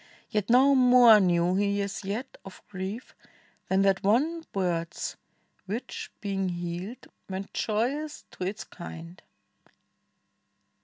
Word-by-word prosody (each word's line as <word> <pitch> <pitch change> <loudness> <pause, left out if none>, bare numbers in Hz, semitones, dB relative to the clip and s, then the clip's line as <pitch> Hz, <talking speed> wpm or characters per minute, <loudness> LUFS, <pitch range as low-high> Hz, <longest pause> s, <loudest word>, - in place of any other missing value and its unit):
Yet 210 -1 -1
not 260 +4 +6
more 245 -3 +8
Knew 175 -2 +2
he 200 +1 +1
as 200 +1 -5
yet 220 +7 -4
of 195 - -12
grief 195 +4 -6 0.5
than 190 +1 +2
that 195 -1 +3
one 295 +12 +2
bird's, 170 -3 -2 0.5
Which, 220 +6 -5
being 195 -2 -1
healed, 175 +7 -5 0.2
went 190 +1 -5
joyous 265 +8 -2
to - - -7
its 200 +3 -4
kind. 170 -1 -10
200 Hz, 115 wpm, -28 LUFS, 185-235 Hz, 0.5 s, more